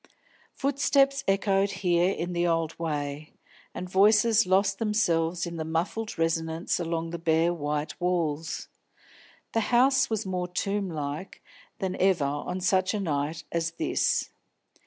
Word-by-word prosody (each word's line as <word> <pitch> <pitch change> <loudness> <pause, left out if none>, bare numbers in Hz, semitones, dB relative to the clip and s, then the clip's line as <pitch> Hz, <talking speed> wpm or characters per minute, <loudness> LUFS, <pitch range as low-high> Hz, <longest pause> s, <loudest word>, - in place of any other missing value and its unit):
Footsteps 275 0 +2
echoed 195 0 +2
here 175 -2 +1
in 175 -1 -3
the 175 0 +1
old 165 -1 0
way, 150 -2 -4 0.4
and 180 - -6
voices 210 +3 +4
lost 195 +1 +2
themselves 175 -6 +1
in 170 -1 -6
a - - -1
muffled 170 +8 -2
resonance 165 +1 -1
along 165 -1 -2
the 170 - -5
bare 165 +1 +2
white 150 0 -3
walls. 165 -3 -1 0.9
The 225 - +2
house 260 +2 +4
was 220 -2 -2
more 180 -1 -2
tomb 195 +2 -2
like 150 +2 -5 0.3
than 190 -4 -2
ever 185 -6 +3
on 145 +6 -3
such 185 +2 +2
a - - -1
night 155 -2 -2
as 170 0 -1
this. - - 0
175 Hz, 135 wpm, -27 LUFS, 165-195 Hz, 0.9 s, voices